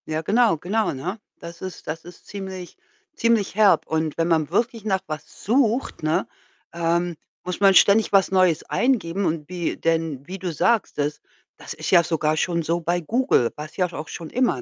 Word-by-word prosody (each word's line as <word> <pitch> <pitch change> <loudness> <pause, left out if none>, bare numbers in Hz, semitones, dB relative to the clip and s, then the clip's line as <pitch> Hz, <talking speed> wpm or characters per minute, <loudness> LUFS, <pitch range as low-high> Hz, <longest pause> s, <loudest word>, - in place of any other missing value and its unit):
Ja 155 0 -2
genau, 220 -1 +3
genau, 210 +8 -1
ne? 180 +11 -5 0.2
Das 170 0 -10
ist 185 -2 -7
das 160 +1 -5
ist 175 0 -14
ziemlich 190 -3 -7 0.4
ziemlich 230 -6 +1
herb 210 -2 +4
und 160 -1 -2
wenn 165 0 +1
man 160 -3 +1
wirklich 230 +4 -1
nach 190 -3 0
was 155 -1 -8
sucht, 240 +1 +1
ne, 155 +1 0 0.5
ähm, 170 0 0 0.3
muss 180 0 -4
man 195 -1 +6
ständig 205 +4 +5
was 195 -2 +4
Neues 185 -4 +3
eingeben. 200 -7 0
Und 155 -3 -2
wie, 175 -2 -2
denn 160 -4 -1
wie 190 +2 -7
du 180 -1 -3
sagst, 220 +7 +1
das 145 0 -2 0.4
das - - -8
ist - - -4
ja 175 -3 +7
sogar 155 -2 0
schon 170 +1 0
so 170 +2 0
bei 175 +2 0
Google, 225 - +1
war's 150 +1 -9
ja 180 -2 0
auch 155 +1 -6
schon 165 -2 -7
immer, 245 - +1
175 Hz, 190 wpm, -23 LUFS, 160-200 Hz, 0.5 s, ja